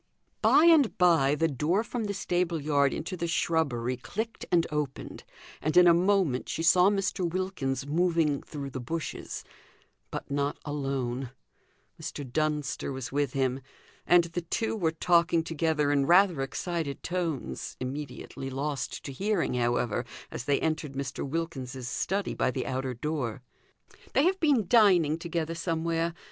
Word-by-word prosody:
By 270 +9 +6
and 315 -8 +5
by 165 -6 +4
the 165 +2 +2
door 160 - 0
from 230 -1 -3
the 200 -1 -3
stable 175 -3 0
yard 140 -2 +2
into 165 +4 -4
the 170 -1 -3
shrubbery 135 -8 0
clicked 220 - -5
and 170 -1 +4
opened, 150 -3 -4 0.4
and 155 +3 0
in 180 - +9
a 170 - +7
moment 180 -7 +2
she 165 - -2
saw 180 +2 +6
Mr. 195 -2 -1
Wilkins 165 -8 -2
moving 160 -2 +1
through 140 -3 -7
the 130 - -5
bushes; 155 +6 -5 0.7
but - - -6
not 140 +1 0
alone, 135 -3 -2 0.7
Mr. 145 - -5
Dunster 150 +1 -1
was 130 -2 -5
with 140 -2 0
him, 135 -1 0 0.5
and 175 0 +6
the 170 +1 -4
two 225 +7 -2
were 175 -7 +1
talking 170 0 +2
together 160 -2 0
in 140 -1 +2
rather 180 -4 +5
excited 155 +1 -3
tones, 170 -6 -3
immediately 135 0 -6
lost 140 +1 -3
to 140 - -6
hearing, 200 +7 0
however, 120 -2 0 0.3
as 125 - -5
they 145 - +2
entered 155 -3 -1
Mr. 135 -1 -4
Wilkins's 135 -5 -4
study 195 +9 -1
by - - +1
the 130 0 -3
outer 130 -1 -2
door. 130 -3 -3 0.7
"They 275 - +4
have 375 +3 +2
been 280 - +3
dining 180 -9 +5
together 165 -1 -2
somewhere. 165 0 -1
160 Hz, 150 wpm, -28 LUFS, 135-175 Hz, 0.7 s, in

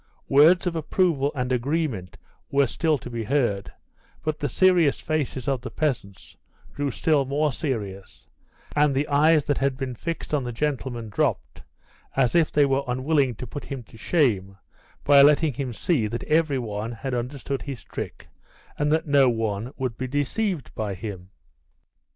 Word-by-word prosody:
Words 160 +7 +6
of 175 -2 -1
approval 160 -3 +1
and 125 -1 -2
agreement 125 - -1 0.3
were 140 0 +3
still 155 +4 0
to 125 - -10
be 115 -1 -3
heard, 105 -7 0 0.5
but 155 -1 -2
the 145 - -1
serious 180 -6 +4
faces 145 -4 -2
of 135 -3 0
the 130 - -6
peasants 120 - -3 0.4
grew 145 0 -1
still 145 +2 +2
more 145 +3 0
serious, 105 - -5 0.5
and 145 -2 +3
the 140 +2 +1
eyes 150 +1 +4
that 145 - 0
had 135 -1 0
been 130 -2 -3
fixed 165 +6 -5
on 145 -3 +1
the 120 - -4
gentleman 125 -3 -3
dropped, 65 -10 -1 0.5
as 125 - +2
if 170 -2 +3
they 145 -1 +4
were 135 0 +1
unwilling 130 0 +1
to 125 - -7
put 140 +5 -7
him 135 -3 -6
to 110 - -19
shame 105 - +1 0.5
by 140 -1 +7
letting 150 +1 +5
him 130 0 -3
see 120 -1 0
that 115 +2 -4
every 155 -3 +2
one 110 -1 -4
had 130 +3 -5
understood 130 +2 -3
his 135 -4 -7
trick, - - -7 0.5
and 150 0 +1
that 160 +1 +2
no 140 -3 +5
one 110 0 -2
would 130 -4 -3
be 130 - -2
deceived 145 - -2
by 105 -4 -3
him. 95 -2 -7
135 Hz, 170 wpm, -25 LUFS, 120-150 Hz, 0.5 s, by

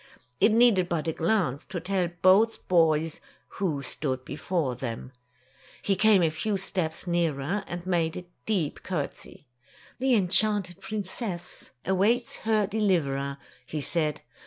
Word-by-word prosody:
It 215 - +5
needed 215 -6 +4
but 165 -1 -1
a 160 - 0
glance 165 - 0
to 180 - -4
tell 185 +1 0 0.2
both 205 +5 +4
boys 160 -2 +2 0.4
who 155 -8 -1
stood 130 -1 -3
before 150 -2 -1
them. 120 0 -5 0.7
He 195 - +2
came 200 -1 +5
a 160 - +2
few 200 +6 -1
steps 180 -4 -3
nearer 170 +1 0
and 175 0 -6
made 170 -3 0
a 180 - -7 0.2
deep 185 -9 0
courtesy. 150 -4 -5 0.5
"The 260 -1 +3
enchanted 195 -1 +1
princess 200 -3 -4 0.2
awaits 210 +6 +1
her 215 -2 +1
deliverer," 160 -10 0 0.3
he 155 - -3
said. 150 0 0
180 Hz, 135 wpm, -27 LUFS, 155-205 Hz, 0.7 s, It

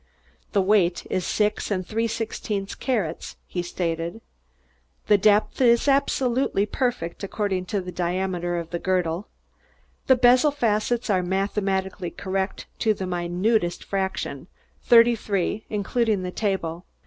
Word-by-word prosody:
"The 200 -3 +3
weight 185 -3 +2
is 185 -2 -1
six 210 0 0
and 185 -3 -1
three 225 +3 -1
sixteenths 215 -3 -3
carats," 205 - -2
he 180 - -3
stated. 170 +2 -3 0.9
"The 205 -1 +4
depth 210 +5 +3
is 235 +1 +4
absolutely 265 -5 +2
perfect 215 -7 -2
according 195 -2 -2
to 200 +1 -2
the 180 0 -7
diameter 175 0 -1
of 170 -1 -5
the 170 - -2
girdle. 180 +1 -1 0.8
The 260 - +7
bezel 250 +4 +5
facets 235 -3 0
are 185 -2 +3
mathematically 190 -1 -1
correct 190 +1 -3
to 220 -2 +2
the 190 - -4
minutest 175 +2 0
fraction 190 -1 -3 0.3
thirty 235 -1 +6
three, 205 0 -2
including 210 -1 0
the 180 - -3
table. 180 -5 -2
195 Hz, 130 wpm, -24 LUFS, 180-225 Hz, 0.9 s, The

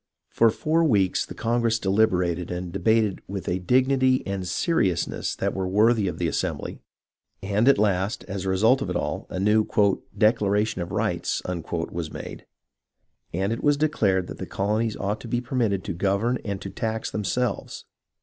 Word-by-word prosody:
For 115 - +4
four 160 +8 +1
weeks 100 - +2
the - - -9
congress 115 0 +1
deliberated 90 -4 +1
and 90 0 -4
debated 105 +1 +1
with 100 0 -5
a 90 - 0
dignity 130 +5 +2
and 95 -2 -3
seriousness 95 - 0
that - - -1
were 95 -1 -2
worthy 105 +2 +3
of 90 -3 -3
the 85 - 0
assembly, - - -3 0.6
and, 105 +5 +1
at 140 - +6
last, 100 -1 0
as 100 -1 -5
a 95 - -2
result 110 +8 +3
of - - -3
it - - -2
all, - - -3
a 90 - -4
new 105 +3 +3 0.4
" - - -24
declaration 105 -2 +2
of 85 - -4
rights" - - -1
was 85 -2 -4
made, - - -8 0.8
and 95 +5 -1
it 115 - -6
was 145 -1 +3
declared 105 -12 +1
that - - -9
the - - -5
colonies 105 +3 -1
ought 105 +2 -2
to - - -8
be 120 +1 0
permitted 120 -6 -1
to 100 - -4
govern 100 +7 0
and 100 -2 -4
to - - -6
tax 110 0 -3
themselves. 115 +4 -2
105 Hz, 175 wpm, -25 LUFS, 95-115 Hz, 0.8 s, at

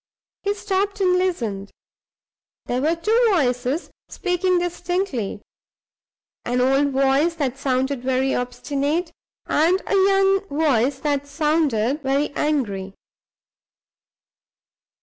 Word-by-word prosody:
He 405 +1 -1
stopped 400 0 -1
and 365 -2 +3
listened. 235 - -1 1.0
There 245 +1 -1
were 315 +4 +2
two 440 +8 +2
voices 270 - 0 0.2
speaking 365 0 0
distinctly 350 - -2 1.0
an 245 +1 -1
old 270 +3 +3
voice 275 +5 +2
that 275 -6 -2
sounded 265 -1 0
very 260 +1 0
obstinate, 280 +7 -2 0.3
and 335 +5 +2
a - - -2
young 390 0 +3
voice 280 - +1
that 285 -1 -1
sounded 295 -4 0
very 275 +2 0
angry. 205 -12 -1
290 Hz, 100 wpm, -22 LUFS, 255-355 Hz, 1.0 s, and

